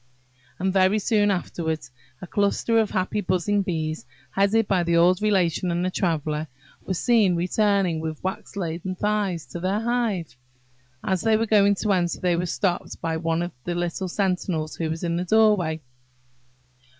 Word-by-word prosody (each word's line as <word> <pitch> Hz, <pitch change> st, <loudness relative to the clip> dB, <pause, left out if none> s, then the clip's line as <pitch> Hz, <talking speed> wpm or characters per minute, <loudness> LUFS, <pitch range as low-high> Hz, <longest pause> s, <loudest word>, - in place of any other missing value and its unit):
And 190 Hz, +1 st, 0 dB
very 190 Hz, +2 st, +4 dB
soon 210 Hz, 0 st, +2 dB
afterwards 160 Hz, -6 st, -2 dB, 0.3 s
a -, -, -4 dB
cluster 205 Hz, +4 st, +1 dB
of 220 Hz, -2 st, +1 dB
happy 190 Hz, +3 st, -1 dB
buzzing 185 Hz, +2 st, +1 dB
bees, 160 Hz, -7 st, -3 dB, 0.2 s
headed 200 Hz, +2 st, +2 dB
by 190 Hz, -3 st, +2 dB
the 170 Hz, 0 st, +1 dB
old 180 Hz, +3 st, +4 dB
Relation 185 Hz, -4 st, +1 dB
and 175 Hz, +1 st, 0 dB
the 185 Hz, -, -1 dB
Traveller, 155 Hz, -4 st, -1 dB, 0.4 s
were 185 Hz, -, -2 dB
seen 215 Hz, -3 st, +3 dB
returning 185 Hz, -1 st, +1 dB
with 160 Hz, -1 st, -5 dB
wax 190 Hz, +2 st, -5 dB
laden 180 Hz, 0 st, -3 dB
thighs 200 Hz, -5 st, -1 dB
to 130 Hz, +7 st, -7 dB
their 190 Hz, +4 st, 0 dB
hive. 225 Hz, -, -1 dB, 0.7 s
As 190 Hz, -2 st, 0 dB
they 220 Hz, -1 st, +3 dB
were 225 Hz, -, 0 dB
going 205 Hz, -2 st, +4 dB
to 210 Hz, -2 st, +2 dB
enter, 175 Hz, -2 st, 0 dB
they 180 Hz, -1 st, +1 dB
were 175 Hz, +1 st, -1 dB
stopped 180 Hz, 0 st, -2 dB
by 165 Hz, -1 st, -2 dB
one 165 Hz, +1 st, 0 dB
of 175 Hz, -, -4 dB
the 175 Hz, -, -3 dB
little 175 Hz, +2 st, -2 dB
sentinels 180 Hz, -4 st, -1 dB
who 165 Hz, -2 st, -2 dB
watch 160 Hz, +1 st, -4 dB
the 175 Hz, +1 st, -1 dB
doorway. 205 Hz, -8 st, +3 dB
185 Hz, 165 wpm, -24 LUFS, 170-205 Hz, 0.7 s, very